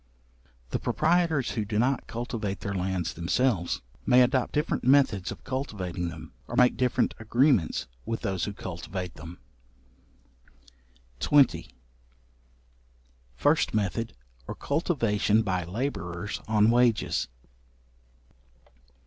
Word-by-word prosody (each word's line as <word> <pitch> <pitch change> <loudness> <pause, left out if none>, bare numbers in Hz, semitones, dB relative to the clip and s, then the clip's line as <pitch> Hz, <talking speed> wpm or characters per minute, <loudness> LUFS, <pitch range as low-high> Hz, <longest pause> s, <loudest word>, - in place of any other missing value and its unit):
The - - -1
proprietors 165 -5 +1
who 110 - -1
do 105 +1 -3
not 130 +4 +1
cultivate 115 -4 -4
their 100 - -3
lands 95 -2 -2
themselves, 90 - 0 0.2
may 125 0 +6
adopt 125 0 +1
different 150 +1 -1
methods 130 -7 +3
of - - -9
cultivating 95 -10 -3
them, 80 -1 -10
or - - -5
make 125 0 +5
different 125 -1 +1
agreements 115 - +2 0.2
with 115 0 -3
those 95 -3 -1
who 105 - -4
cultivate 90 -1 -6
them. 80 +4 -10 1.8
§20. 145 -2 +3 1.7
First - - +2
method, 110 +2 -1 0.3
or - - -5
cultivation 115 - +1
by 90 -4 -1
labourers 90 -3 -4
on 110 0 +4
wages. 120 -3 +2
110 Hz, 105 wpm, -27 LUFS, 90-125 Hz, 1.8 s, may